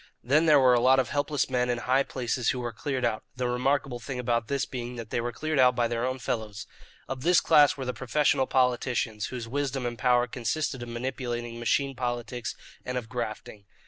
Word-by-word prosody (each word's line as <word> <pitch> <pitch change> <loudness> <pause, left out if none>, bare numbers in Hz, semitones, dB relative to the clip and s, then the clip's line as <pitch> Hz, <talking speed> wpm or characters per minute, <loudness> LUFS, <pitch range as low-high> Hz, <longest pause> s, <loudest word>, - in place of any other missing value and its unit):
Then 150 +7 +3
there 150 -2 +7
were 130 -2 +5
a 120 - +4
lot 130 +2 +5
of 130 -2 +1
helpless 145 0 0
men 125 -1 0
in 120 - +1
high 130 +3 +2
places 125 -3 -1
who 130 - 0
were 120 -1 -4
cleared 130 +2 -2
out, 110 -2 -1
the 125 -1 -1
remarkable 125 +1 0
thing 125 +3 -6
about 120 -2 0
this 140 +1 0
being 125 -1 -6
that 115 -2 -8
they 120 - 0
were 120 +1 -2
cleared 155 +4 -2
out 125 -1 +5
by 120 -1 +2
their 120 +1 -1
own 130 0 -2
fellows. 110 -5 -4 0.4
Of 130 -1 -5
this 175 +4 +5
class 145 -2 +5
were 135 - -4
the 125 - -2
professional 130 +2 +1
politicians, 125 -4 0
whose 120 -3 -6
wisdom 135 0 -2
and 120 -1 -4
power 125 +1 +3
consisted 125 +2 -2
of 120 - -6
manipulating 120 -1 -4
machine 135 +3 0
politics 120 -1 -3 0.3
and 125 0 -3
of 115 -3 -5
grafting. 110 -3 -5
125 Hz, 210 wpm, -27 LUFS, 120-130 Hz, 0.4 s, there